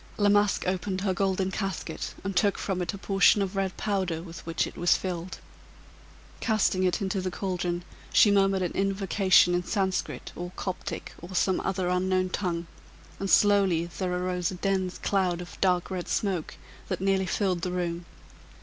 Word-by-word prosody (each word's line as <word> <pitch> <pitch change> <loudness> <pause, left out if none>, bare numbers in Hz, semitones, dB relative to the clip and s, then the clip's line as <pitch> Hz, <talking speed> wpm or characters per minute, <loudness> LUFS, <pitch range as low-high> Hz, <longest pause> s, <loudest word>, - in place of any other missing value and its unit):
La 205 -1 +3
Masque 205 0 +3
opened 185 +1 -1
her 195 -1 +1
golden 190 0 0
casket, 190 -4 -4
and 195 0 -3
took 200 +2 +3
from 185 -2 -2
it 175 - -1
a 200 - -7
portion 195 +1 +4
of 195 0 -2
red 195 -1 -1
powder, 190 -6 -1
with 170 -1 -9
which 165 -1 0
it - - -9
was 175 0 +3
filled. 180 -1 -4 1.0
Casting 215 -4 +1
it 185 +2 +1
into 190 0 -1
the 185 - -2
caldron, 175 -2 -2 0.3
she 205 - +6
murmured 195 -1 +3
an 175 - -1
invocation 195 -2 +3
in 175 0 +1
Sanscrit, 190 -1 -2
or 175 0 -5
Coptic, 185 -2 -5
or 180 +2 -8
some 185 +1 +2
other 190 -2 -1
unknown 185 +1 +1
tongue, 175 -3 -2 0.5
and 195 - -2
slowly 195 -6 +4
there 185 -2 -1
arose 180 -1 -1
a 185 - -5
dense 190 -1 -1
cloud 185 -3 0
of 180 - -10
dark 180 -1 +2
red 180 -2 -3
smoke, 190 -6 -1 0.3
that - - -2
nearly 190 0 +1
filled 185 -1 0
the 180 - -2
room. 175 -1 -2
185 Hz, 175 wpm, -27 LUFS, 180-195 Hz, 1.0 s, she